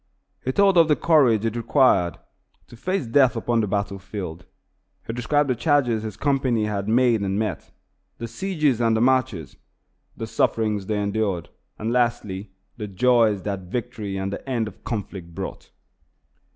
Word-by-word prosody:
He 130 - 0
told 195 +3 +4
of 165 - +6
the 150 - +4
courage 130 -11 +3
it 115 0 -1
required 115 - +3 0.5
to - - -12
face 185 +6 -2
death 130 +2 +4
upon 115 0 +1
the 105 - -1
battle 100 0 -2
field. 90 -4 -7 0.6
He 115 - -4
described 145 +5 +1
the 130 - +2
charges 120 -3 +2
his 110 -2 -6
company 130 -6 +1
had 100 -2 -3
made 120 -1 +3
and 100 0 -1
met, 110 0 -3 0.5
the 115 - -5
sieges 150 - 0
and 115 -1 +3
the - - +1
marches, 125 - +1 0.6
the - - -4
sufferings 105 -3 0
they 105 -1 0
endured, 100 -4 -1 0.3
and, 110 +2 -2
lastly, 110 -5 -1 0.3
the 105 -3 -5
joys 110 -1 +3
that 95 -3 -4
victory 115 -5 -4
and 95 +1 -3
the 135 - -7
end 115 -4 0
of 105 - -10
the - - -32
conflict 95 -7 -5
brought. - - -6
115 Hz, 165 wpm, -23 LUFS, 100-125 Hz, 0.6 s, of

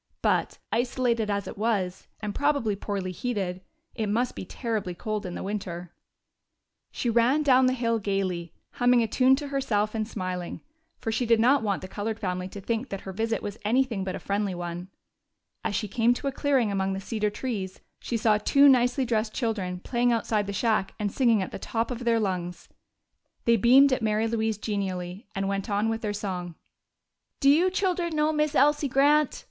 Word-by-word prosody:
But, - - +1
isolated 235 -2 0
as 200 -1 -1
it - - -8
was, 200 -5 -1
and 210 -1 -3
probably 285 -7 +1
poorly 195 -2 -3
heated, 185 -3 -3 0.3
it 220 -4 -2
must 240 +4 0
be - - -5
terribly 215 -4 -3
cold 215 +1 -3
in 175 - -5
winter. 180 -4 -5 1.0
She - - -4
ran 240 +6 +3
down 260 -2 +5
the 255 - +2
hill 230 -2 0
gayly, 190 -4 -2 0.2
humming 245 -1 +3
a - - 0
tune 255 +4 +4
to 285 +1 -5
herself 215 -7 0
and 215 -1 -2
smiling, 185 -5 -4 0.4
for 225 - -3
she 235 +2 -1
did 230 -1 +4
not 260 +5 +4
want 200 -4 -1
the - - -5
colored 215 +3 -4
family 185 -2 -2
to 200 - -9
think 230 +6 -2
that 195 - -5
her 190 - -7
visit 225 +3 -1
was 205 +1 -5
anything 230 -2 +1
but 190 - -3
a - - -5
friendly 200 -1 -1
one. 175 +1 -5 0.7
As 205 - -1
she 210 - -1
came 235 +4 +2
to 280 - -7
a 275 - +1
clearing 265 -6 +1
among 195 -1 0
the 190 - -3
cedar 210 +1 -1
trees 205 -4 -4 0.2
she 235 - -2
saw 215 -1 +3
two 280 +6 +5
nicely 255 0 +4
dressed 220 -2 -1
children 200 -7 -2
playing 245 +2 +1
outside 220 -3 0
the - - -2
shack 210 -1 0
and 205 -1 -2
singing 230 -5 +3
at - - -7
the - - -6
top 230 +4 -2
of 245 0 -5
their 230 -1 +3
lungs. 180 -4 -3 0.8
They 235 - +5
beamed 260 +5 +6
at 255 - 0
Mary 215 0 +1
Louise 220 -2 -1
genially 195 -2 -4
and 195 0 -1
went 195 +1 -2
on 205 +2 +1
with 225 0 -2
their 210 - -2
song. 180 -4 -4 0.8
"Do 275 - +5
you 340 +6 +4
children 360 -3 -1
know 305 +1 +2
Miss 300 0 0
Elsie 295 +1 +4
Grant?" 290 +2 +3
220 Hz, 195 wpm, -27 LUFS, 195-245 Hz, 1.0 s, beamed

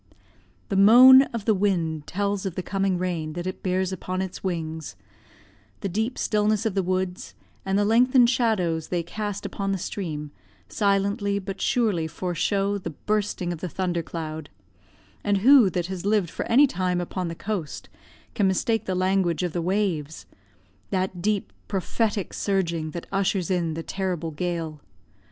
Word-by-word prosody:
The 195 - -1
moan 245 +7 +9
of 230 -4 -5
the 220 - +4
wind 170 -6 0
tells 200 +1 -1
of 180 - -5
the 185 - -3
coming 195 -1 0
rain 170 -4 -2
that 175 +1 -5
it 185 +1 -5
bears 185 0 0
upon 185 0 -4
its 190 -1 -5
wings; 160 - -4 0.9
the 195 - -2
deep 220 +7 -2
stillness 215 0 +1
of 220 - 0
the 195 - +1
woods, 185 0 -3 0.3
and 195 +1 +1
the 205 - +2
lengthened 245 +3 +5
shadows 215 - +1
they 175 -1 -1
cast 205 +3 -5
upon 195 -1 -3
the 195 - 0
stream, 155 -6 -5 0.4
silently 200 0 +1
but 195 -1 -6
surely 215 -11 +1
foreshow 195 +4 -1
the 175 - -5
bursting 200 +1 -2
of 165 - -8
the 180 - -4
thunder 175 -1 -1
cloud; 160 -2 -6 0.7
and 205 -1 +2
who 265 -7 +8
that 175 -1 -2
has 185 -1 -5
lived 200 -4 +1
for - - -4
any 265 +6 +6
time 180 -7 -1
upon 180 +1 -3
the 165 - -5
coast, 195 -5 -4 0.5
can 200 - +2
mistake 225 +4 0
the 185 - -1
language 185 -2 +1
of 175 -2 -2
the 175 - -1
waves; 175 -5 -1 0.6
that 185 -2 -2
deep 205 +1 -1
prophetic 205 +1 -1
surging 170 -5 -1
that 170 +2 -6
ushers 195 -2 0
in 170 -3 0
the 165 - -4
terrible 180 -4 -3
gale? 165 -2 -4
190 Hz, 165 wpm, -25 LUFS, 170-205 Hz, 0.9 s, moan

